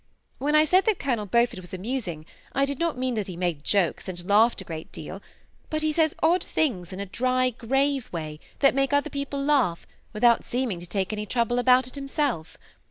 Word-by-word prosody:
When 295 +3 +1
I 305 0 +6
said 370 +5 +4
that 435 -4 +2
Colonel 235 -7 -1
Beaufort 235 -1 +2
was 180 0 -8
amusing, 185 -6 -4 0.3
I 275 - +2
did 280 -1 -4
not 335 -6 0
mean 255 0 -1
that 215 -4 -2
he 180 -3 -7
made 175 -5 -2
jokes, 195 -1 +1
and 175 -1 -5
laughed 220 +4 +4
a - - -5
great 160 -1 -7
deal; 185 +6 -8 0.5
but 310 0 -1
he 310 - +2
says 315 0 +2
odd 345 +3 +4
things 195 - -1
in 185 - -7
a 200 - -3
dry, 255 +5 +1
grave 270 +3 0
way, 155 -3 -5 0.2
that 275 - +5
make 275 +1 +1
other 285 +1 +2
people 280 0 -3
laugh, 260 - +2 0.3
without 235 +2 +4
seeming 245 -7 -2
to 175 - -10
take 195 +2 -2
any 210 0 -4
trouble 240 +2 +1
about 250 0 +5
it 255 - -8
himself. 275 - -2
245 Hz, 210 wpm, -26 LUFS, 190-280 Hz, 0.5 s, I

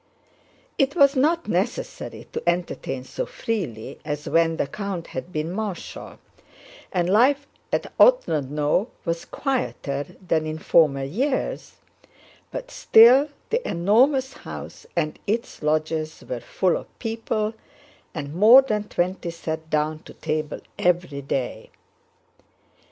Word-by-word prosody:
It 275 0 +2
was 280 -3 +5
not 320 +6 +2
necessary - - -3
to - - -2
entertain 170 -7 -2
so 130 +1 -4
freely 165 - -4
as 150 -1 -4
when 165 -1 +2
the - - +1
count 190 +2 -5
had 150 +7 -7
been 155 +1 -2
Marshal, 200 -2 -5 0.7
and 175 -2 +1
life 260 +9 +4 0.3
at - - -2
Otrádnoe 150 - +3 0.2
was 165 -1 -2
quieter 195 - -2 0.2
than 160 -2 +1
in 155 0 -3
former 150 -4 +3
years, 260 - -2 0.8
but - - -6
still 250 +6 +7 0.2
the 470 +2 +2
enormous 255 - +3
house - - -9
and 155 -3 -1
its 225 +3 -2
lodges 155 +1 -1
were 125 - -3
full 180 +8 0
of - - -12
people 225 -1 -2 0.6
and 145 -2 -5
more 225 +9 +8
than 210 -5 -1
twenty 180 0 -1
sat 160 -1 -5
down 155 0 0
to - - -14
table 155 -1 -3 0.2
every 175 -5 +1
day. 135 -2 -3
175 Hz, 125 wpm, -24 LUFS, 155-235 Hz, 0.8 s, more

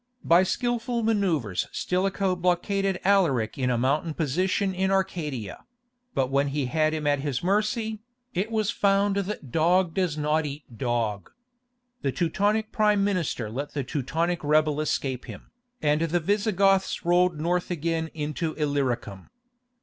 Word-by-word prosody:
By 170 +2 +5
skilful 240 +4 -1
manœuvres 175 - 0
Stilicho 185 +1 0
blockaded 180 +2 0
Alaric 160 - +2
in 130 -1 +1
a 125 - +1
mountain 150 +6 0
position 185 +6 0
in 190 +1 0
Arcadia; 165 - -2 0.5
but 130 0 0
when 140 +1 +2
he 140 0 -1
had 155 +5 +1
him 155 -1 -4
at 145 -1 +2
his 135 -1 -2
mercy, 215 +3 0 0.3
it 190 +5 -1
was 220 -2 0
found 200 -2 +2
that 195 - -4
"dog 170 +3 +3
does 180 -5 0
not 150 +1 +1
eat 145 +1 -7
dog." 115 -5 -2 0.7
The 135 - 0
Teutonic 205 - 0
prime 210 -2 +3
minister 180 - -1
let 135 +8 -5
the 140 - -1
Teutonic 160 +6 -2
rebel 150 0 +2
escape 135 -4 -2
him, - - -11 0.3
and 150 +1 +2
the 165 +1 +1
Visigoths 195 0 +1
rolled 175 -2 +3
north 175 +3 0
again 165 -1 -1
into 155 +1 -3
Illyricum. 130 - -2
170 Hz, 140 wpm, -26 LUFS, 145-195 Hz, 0.7 s, By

